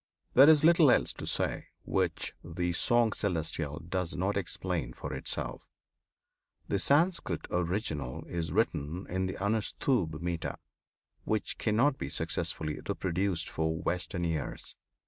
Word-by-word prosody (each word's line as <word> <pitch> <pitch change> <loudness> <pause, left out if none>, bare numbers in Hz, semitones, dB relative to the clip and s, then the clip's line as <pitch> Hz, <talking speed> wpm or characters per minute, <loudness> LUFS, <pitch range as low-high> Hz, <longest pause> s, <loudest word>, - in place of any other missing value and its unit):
There 135 +4 +9
is 155 -2 +6
little 165 -2 +7
else - - +3
to - - -7
say - - -1 0.2
which - - -1
the 85 +1 -2
"Song 120 +4 +3
Celestial" 80 -5 -1
does 90 +1 -3
not 95 +4 0
explain 90 -8 -2
for - - -6
itself. - - -3 1.0
The 100 - 0
Sanskrit 165 - +2
original 85 - -2
is 85 -2 -3
written 90 -4 0
in 95 +1 -1
the 95 - -4
Anushtubh 100 - 0
metre, 85 -1 -3 0.7
which 110 -1 -2
cannot 125 +6 +2
be - - -3
successfully 80 -2 -2
reproduced 90 -2 -1
for 80 0 -1
Western 85 +2 -2
ears. 80 -3 -3
90 Hz, 125 wpm, -30 LUFS, 80-110 Hz, 1.0 s, There